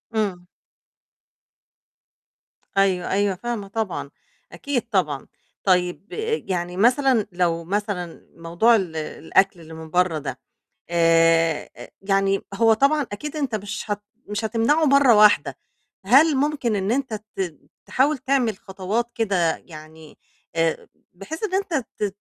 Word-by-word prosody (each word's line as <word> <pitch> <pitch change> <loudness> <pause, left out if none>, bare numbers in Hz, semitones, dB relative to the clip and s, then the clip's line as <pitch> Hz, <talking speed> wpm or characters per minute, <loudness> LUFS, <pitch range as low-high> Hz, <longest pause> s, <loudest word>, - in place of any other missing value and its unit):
إمم. 190 -5 -2 2.3
أيوه، 190 -2 +2
أيوه 200 0 +1
فاهمة 225 0 -5
طبعًا، 220 +1 -3 0.4
أكيد 280 -4 -2
طبعًا. 155 -9 0 0.4
طيب 180 +1 0 0.4
يعني 180 -1 -3
مثلًا 245 +1 +3
لو 175 -2 0
مثلًا 190 -2 -4
موضوع 170 +8 +3
ال 185 -7 -2
الأكل 180 +4 0
الى 160 0 -12
من 160 0 -9
برّه 180 -1 +1
ده 135 -3 -6 0.5
آآ، 165 -1 +3 0.3
يعني 195 0 +1
هو 225 +2 +4
طبعًا، 280 +7 +3
أكيد 300 +9 -6
أنت 275 -6 -2
مش 205 +1 -5
هت 205 0 -2 0.2
مش 210 +2 -4
هتمنعه 230 +8 +2
مرّة 275 -4 +5
واحدة، 210 0 +5 0.5
هل 275 +8 +5
مُمكن 275 -5 0
إن 195 +1 -1
أنت 260 -1 -1 0.2
ت 175 -6 -3 0.3
تحاول 280 +3 +1
تعمل 255 -5 0
خطوات 200 +5 -3
كده 190 -7 +1
يعني 155 -1 -14 0.4
آآ 165 -1 0 0.2
بحيث 195 - -8
إن 400 - -2
أنت 390 -2 -1 0.2
تت 210 - +1
200 Hz, 125 wpm, -23 LUFS, 175-240 Hz, 2.3 s, مرّة